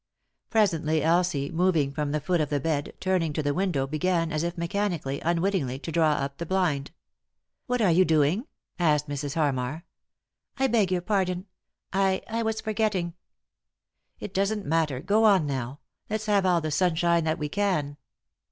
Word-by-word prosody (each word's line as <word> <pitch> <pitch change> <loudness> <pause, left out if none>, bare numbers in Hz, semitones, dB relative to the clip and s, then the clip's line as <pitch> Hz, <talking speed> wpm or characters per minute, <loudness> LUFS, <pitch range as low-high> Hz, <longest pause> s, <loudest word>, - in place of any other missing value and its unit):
Presently 165 -8 +2
Elsie, 165 -4 +1
moving 165 -5 +2
from 145 0 -2
the 150 - 0
foot 175 +2 0
of 150 - -1
the 145 - 0
bed, 145 0 -2
turning 180 -5 0
to 155 - -2
the 145 0 0
window, 175 -6 0
began, 165 +3 0
as 155 0 -1
if 170 +1 -3
mechanically, 170 -5 -2
unwittingly, 170 -6 0
to 160 +4 -6
draw 160 -2 +3
up 140 -1 -3
the 170 - -3
blind. 165 -7 0 0.4
" - - -56
What 250 -2 +1
are 185 - +4
yon 185 +3 +4
doing? 160 - +2 0.2
" - - -41
asked 150 -3 +2
Mrs. 145 -1 -4
Harmar. 145 0 -1 0.3
" - - -50
I 270 - +2
beg 220 -7 +2
your 180 -1 +1
pardon; 185 -2 0 0.5
I— 190 0 +1
I 230 +1 -2
was 220 -1 -1
forgetting." 210 -5 -1 0.5
" - - -49
It 195 - -7
doesn't 200 +2 0
matter, 150 -4 0
go 205 +5 +2
on 195 -7 +5
now; 135 -1 -4 0.3
let's 215 0 -2
have 200 -3 +2
all 175 -2 +3
the 155 0 -3
sunshine 170 +1 +2
that 160 +1 0
we 150 -3 -3
can." 155 -6 -1
170 Hz, 180 wpm, -26 LUFS, 150-190 Hz, 0.5 s, on